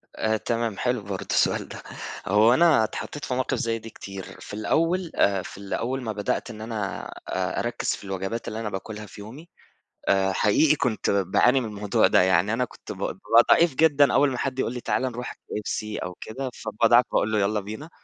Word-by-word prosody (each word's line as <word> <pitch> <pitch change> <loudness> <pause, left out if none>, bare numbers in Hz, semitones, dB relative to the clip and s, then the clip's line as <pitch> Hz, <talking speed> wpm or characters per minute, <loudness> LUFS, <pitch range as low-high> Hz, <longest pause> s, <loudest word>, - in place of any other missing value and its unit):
آآ 110 0 +1
تمام، 115 -2 -2
حلو 125 -2 0
برضه 100 -1 -6
السؤال - - +2
ده. - - -9 0.4
هو 105 +4 +5
أنا 160 -6 +5
اتحطيت 140 +5 -5
في - - -3
مواقف 130 +1 0
زيّ 115 0 -1
دي 115 +1 -10
كتير 100 -3 -9
في - - -10
الأول 165 - 0
آآ 100 -1 +3
في 100 +2 -6
أول 130 +3 -2
ما 110 - -2
بدأت 105 +3 -2
إن 110 -1 -9
أنا 110 -3 -4 0.2
أ - - -1
أركّز - - -3
في - - -13
الوجبات 95 +4 -4
اللي 110 - -4
أنا 110 -2 -3
باكلها 105 +2 -6
في 105 - -12
يومي، 135 +11 -11 0.6
آآ 95 0 +3
حقيقي 145 +11 +4
كنت 125 -7 -1
باعاني 100 +7 +3
من 115 - -3
الموضوع 105 -1 +2
ده - - +5
يعني. 95 +3 +3
أنا 125 +2 +1
كنت - - -11
ب - - -7
بابقى 115 +1 +3
ضعيف 165 -4 +5
جدًا، 145 -2 +4
أول 145 - +4
ما 125 - -3
حد 130 +1 -2
يقول 120 - 0
لي: 125 - -5
"تعالَ - - 0
نروح 125 -1 -3
KFC 105 0 -5
أو 90 -1 -6
كده" 130 +4 -5
فباضعف 115 +2 +3
باقول 110 - +1
له: 110 - +2
"يلّا 105 +2 +1
بينا." 105 +8 -7
آآ - - -15
110 Hz, 205 wpm, -25 LUFS, 105-125 Hz, 0.6 s, هو